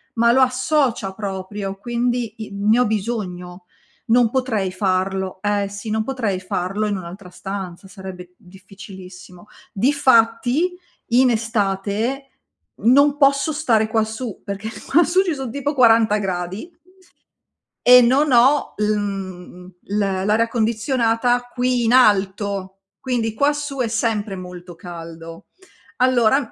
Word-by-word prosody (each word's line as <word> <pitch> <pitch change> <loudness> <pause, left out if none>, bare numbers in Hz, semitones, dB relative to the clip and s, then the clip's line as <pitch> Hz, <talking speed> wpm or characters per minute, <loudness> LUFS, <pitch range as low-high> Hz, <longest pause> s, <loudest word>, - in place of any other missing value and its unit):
ma 235 +1 +4
lo 265 - +4
associa 255 -4 +1
proprio. 195 0 -5
Quindi 240 +1 -2
i 215 -2 -8
ne 210 +4 +2
ho 250 - +3
bisogno, 190 -5 -4 0.4
non 235 0 +4
potrei 225 -7 -1
farlo. 190 0 -1
Eh 205 -1 0
sì, 200 +2 -7
non 220 0 0
potrei 225 -7 -2
farlo 185 +3 -3
in 205 - -1
un'altra 180 +1 -9
stanza, 190 0 -7
sarebbe 185 -2 -10
difficilissimo. 190 -1 -13 0.3
Difatti, 255 - +2 0.4
in 255 +1 +5
estate 220 +3 -1 0.6
non 280 +4 +5
posso 275 +1 +3
stare 235 -8 +1
quassù, 220 0 -3
perché 200 +2 -5 0.2
quassù 345 +4 +3
ci 340 -5 -2
son 265 -4 -5
tipo 285 +2 -2
40 225 -4 +5
gradi 190 - -4 1.2
e 250 0 +9
non 270 +4 +3
ho 260 +4 +4
l 210 - -1
mhmm, 185 -3 -6
l 205 - -4
l'aria 205 +3 +1
condizionata 230 +1 0
qui 250 -1 0
in 230 +2 +2
alto, 195 -4 +2 0.2
quindi 235 -4 -2
quassù 290 +2 -1
è 240 - +1
sempre 220 -3 -1
molto 180 -1 -10
caldo. 165 -1 -10 0.5
Allora 255 0 +3
215 Hz, 120 wpm, -20 LUFS, 190-250 Hz, 1.2 s, e